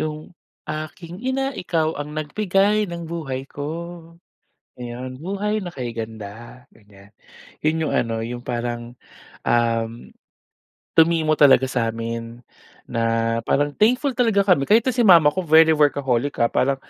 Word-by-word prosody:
yung 155 +1 -5 0.3
aking 165 +4 -7
ina, 270 +2 -1
ikaw 165 -5 -1
ang 150 +1 -6
nag-bigay 195 +6 +1
ng 170 0 -6
buhay 150 -6 -5
ko, 165 +4 -7 0.6
ayon, 125 +1 -7
buhay 200 +7 -2
na 175 - -6
kay 120 -6 -5
ganda, 110 +2 -8
ganyan. 100 -2 -20 0.5
'Yun 160 +1 0
'yung, - - -1
ano, 115 -1 0 0.3
parang, 120 0 -4 0.5
um, 115 0 0 0.9
tumimo 160 -1 +3
talaga 135 -3 +6
sa'min 115 -1 -3 0.4
na 115 - -2 0.5
parang 145 +1 +1
thankful 250 - +2
talaga 225 -5 +2
kami 180 -8 +2
kahit 220 +2 +5
nga 260 - +1
si 250 - -4
mama 165 -5 +7
ko 185 - -3
very 160 +1 +6
workaholic, 145 -3 +1
ah, - - +4
parang, 135 +1 +1
150 Hz, 130 wpm, -22 LUFS, 120-175 Hz, 0.9 s, mama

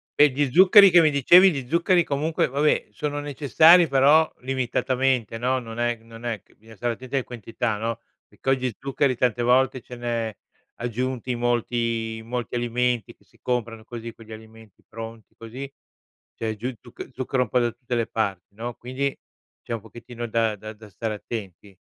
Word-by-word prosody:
E, 150 0 +6
di 140 -1 0
zuccheri 190 +4 +8
che 175 0 +7
mi 155 - +4
dicevi 175 +7 +6
di 135 -6 -4
zuccheri, 170 +2 +3
comunque, 150 +3 0
vabbè, 145 +3 +1
sono 145 -1 -3
necessari, 155 +4 +5
però, 145 +4 +4
limitatamente, 130 -2 -1
no, 130 +2 +1
non 115 -1 -8
è 120 0 +1
non 115 +1 -12
è 115 -4 -3
c - - -27
bisogna 110 +1 -17
stare 120 +3 -2
attenti 130 +3 -7
alle 135 - +1
quantità, 115 -1 -4
no, 115 +1 -3 0.3
perché 135 - -6
oggi 130 -4 -1
zuccheri 135 -1 0
tante 120 0 0
volte 130 +1 +2
ce 125 - -11
n'è 115 -2 -3 0.4
aggiunti 125 +1 -3
molti 115 -1 -1
i - - -8
molti 120 +1 -5
alimenti 120 0 -1
che - - -29
si - - -28
comprano 115 -3 -3
così, 115 -1 -8
quegli 110 -1 -15
alimenti 110 -1 -14
pronti, 115 0 -10
così. 130 +5 -8 0.6
C'è 110 -1 -3
giù 125 +5 -4
zuc 120 - -10
zucchero 130 0 -1
un 110 - -9
po' 125 - +2
da 120 -1 +1
tutte 120 0 -5
le 115 -1 +1
parti, 100 -3 -3
no, 120 +1 -6
quindi, 130 +3 -3 0.5
c'è 120 - -5
un 115 - -4
pochettino 120 +1 -8
da 115 -1 0
da 110 +2 -9
da 105 0 -15
stare 110 +2 -4
attenti. 100 -2 -8
120 Hz, 180 wpm, -24 LUFS, 115-135 Hz, 0.6 s, zuccheri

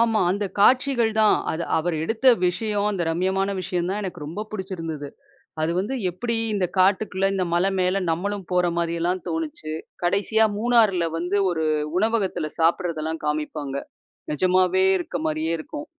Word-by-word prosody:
ஆமா. 225 -2 +3
அந்தக் 200 0 -2
காட்சிகள் 255 -1 +4
தான். 215 -1 +5 0.2
அது 170 +2 -3
அவர் 170 +1 -1
எடுத்த 225 +8 -2 0.2
விஷயம். 205 +2 0
அந்த 195 -4 -2
ரம்மியமான 190 +3 0
விஷயம் 180 -1 -2
தான் 205 +2 -2
எனக்கு 175 -5 -6
ரொம்ப 175 +8 -5
புடுச்சிருந்தது. 165 -7 -5 0.5
அது 160 - +1
வந்து 205 +8 -1 0.2
எப்டி, 230 +6 -2 0.2
இந்தக் 195 -3 -2
காட்டுக்குள்ள 190 0 +2
இந்த 190 -1 0
மலை 180 +3 +2
மேல 185 +2 +1
நம்மளும் 195 +3 -2
போற 180 0 +3
மாரி 170 -1 0
எல்லாம் 180 +1 0
தோணுச்சு. 160 -1 -4 0.3
கடைசியா 205 +5 +3
மூணார்ல 215 -7 +3
வந்து, 180 +4 0
ஒரு 160 -2 -1 0.3
உணவகத்துல 205 -7 0
சாப்பட்றதெல்லாம் 160 -1 0
காமிப்பாங்க. 150 -2 -3 0.6
நெஜமாவே 185 +3 +3
இருக்க 175 - -4
மாரியே 155 +1 -1
இருக்கும். 295 - -7
185 Hz, 145 wpm, -23 LUFS, 165-205 Hz, 0.6 s, தான்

